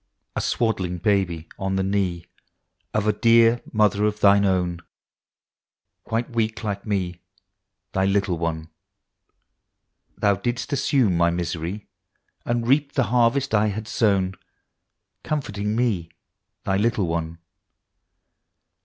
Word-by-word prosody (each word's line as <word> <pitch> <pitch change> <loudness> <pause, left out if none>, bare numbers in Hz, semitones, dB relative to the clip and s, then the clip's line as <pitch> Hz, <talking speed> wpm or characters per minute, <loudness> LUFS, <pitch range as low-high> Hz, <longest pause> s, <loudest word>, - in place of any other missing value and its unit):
A - - -1
swaddled 95 -7 -1
Baby 90 -6 +1
on 95 0 -1
the 95 - +1
knee 95 -3 -1 0.7
Of 105 -1 0
a 105 - +3
dear 115 +1 +4
Mother 105 -1 +2
of 105 0 -1
Thine 100 0 +5
own, 90 -2 0 1.2
Quite 115 +2 -2
weak 115 -1 -1
like 100 -1 -4
me 90 -4 -2 0.7
Thy 95 0 +1
little 95 -3 +1
one. 80 -1 -3 1.5
Thou 100 -1 +2
didst 120 +7 -3
assume 130 -8 +2
my 85 0 +3
misery, 85 +3 -3 0.6
And 120 -1 -1
reap 140 +2 +2
the 130 - +2
harvest 125 +3 +2
I 105 0 +3
had 105 +1 -4
sown, 100 -5 +1 0.9
Comforting 105 -8 -2
me 110 -9 0 0.5
Thy 95 - 0
little 105 -1 +1
one. 85 0 -3
100 Hz, 120 wpm, -23 LUFS, 90-115 Hz, 1.5 s, Thine